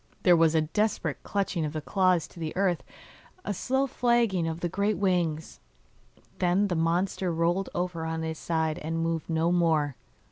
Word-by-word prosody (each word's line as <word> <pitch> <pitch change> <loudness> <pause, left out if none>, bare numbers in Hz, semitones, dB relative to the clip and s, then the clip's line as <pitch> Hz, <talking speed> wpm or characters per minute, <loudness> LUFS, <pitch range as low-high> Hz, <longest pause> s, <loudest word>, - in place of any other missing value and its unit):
There 180 -2 +6
was 165 -1 +4
a 160 - +4
desperate 165 -2 -1
clutching 195 -4 -1
of 150 -1 -3
the 155 - -2
claws 180 +1 +1
to - - -14
the 160 0 -4
earth, 185 -4 +1 0.6
a 205 - -1
slow 265 +7 0
flagging 235 -9 +1
of 165 +1 -4
the 175 - 0
great 200 +4 0
wings, 175 -5 -1 0.8
then 185 +3 +2
the 175 - 0
monster 175 +3 0
rolled 170 +3 0
over 175 -2 -2
on 160 0 -3
his 160 -1 -4
side 160 -2 -1
and 160 +2 -3
moved 165 0 -2
no 165 +1 +1
more. 160 -5 +2
170 Hz, 175 wpm, -27 LUFS, 160-190 Hz, 0.8 s, There